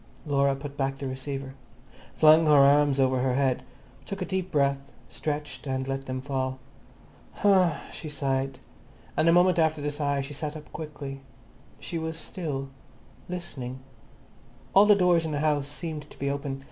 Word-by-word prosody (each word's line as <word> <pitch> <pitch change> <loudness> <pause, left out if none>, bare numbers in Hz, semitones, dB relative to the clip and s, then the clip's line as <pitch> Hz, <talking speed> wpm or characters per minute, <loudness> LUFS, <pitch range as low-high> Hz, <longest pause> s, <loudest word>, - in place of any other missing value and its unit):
Laura 140 -2 +2
put 140 0 -8
back 135 0 -1
the 135 0 -4
receiver, 135 +1 -5 0.6
flung 155 +1 +6
her 150 - +6
arms 140 0 +5
over 130 -1 +3
her 125 0 +1
head, 135 -2 +1 0.4
took 195 - -6
a 185 - -2
deep 190 -1 -2
breath, 140 -3 0 0.2
stretched 145 -3 -4
and 130 0 -2
let 135 0 -3
them 130 0 -3
fall. 130 -1 -2 0.8
"Huh," 185 -6 +3
she 155 - -7
sighed, 135 -2 -1 0.6
and 160 - +2
the - - +7
moment 175 0 +5
after 160 -1 +2
the 145 0 -2
sigh 145 -1 -1
she 135 +2 -7
sat 150 +1 -4
up 150 - -13
quickly. 140 -3 -7 0.6
She 170 - -4
was 160 0 -4
still, 145 -6 -4 0.6
listening. 140 -8 -5 1.0
All 200 +2 +7
the 210 - +7
doors 180 -3 +4
in 160 -2 -3
the 145 - -1
house 145 -2 +1
seemed 150 +1 -6
to - - -15
be 140 0 -1
open. 140 -1 -4
145 Hz, 170 wpm, -27 LUFS, 135-160 Hz, 1.0 s, the